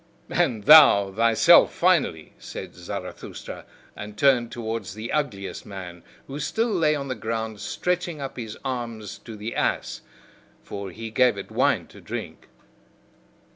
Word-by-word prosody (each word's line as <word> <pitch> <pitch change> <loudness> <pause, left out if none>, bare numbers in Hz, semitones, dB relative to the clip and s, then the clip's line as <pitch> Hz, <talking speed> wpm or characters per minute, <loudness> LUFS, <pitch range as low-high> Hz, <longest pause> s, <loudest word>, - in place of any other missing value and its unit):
"And 110 -4 +1
thou 120 -9 +8
thyself, 115 +2 +5
finally," - - +1
said - - -8
Zarathustra, - - -8 0.3
and 105 0 -8
turned 125 -2 +3
towards 115 -3 -5
the 110 +2 -6
ugliest 115 -11 -3
man, 90 -3 -9 0.2
who 140 +2 -7
still 225 - -1
lay 160 -6 +2
on 140 -1 -4
the 130 - -2
ground 110 -2 -4
stretching 180 - -2
up 135 -1 -6
his 110 -3 -7
arm 120 -4 -3
to 100 +3 -9
the 105 +3 -6
ass - - -1 0.6
(for 100 -1 -6
he 110 +4 -8
gave 125 -2 +3
it 100 - -8
wine - - +2
to - - -14
drink). - - -7
115 Hz, 140 wpm, -24 LUFS, 105-140 Hz, 0.6 s, thou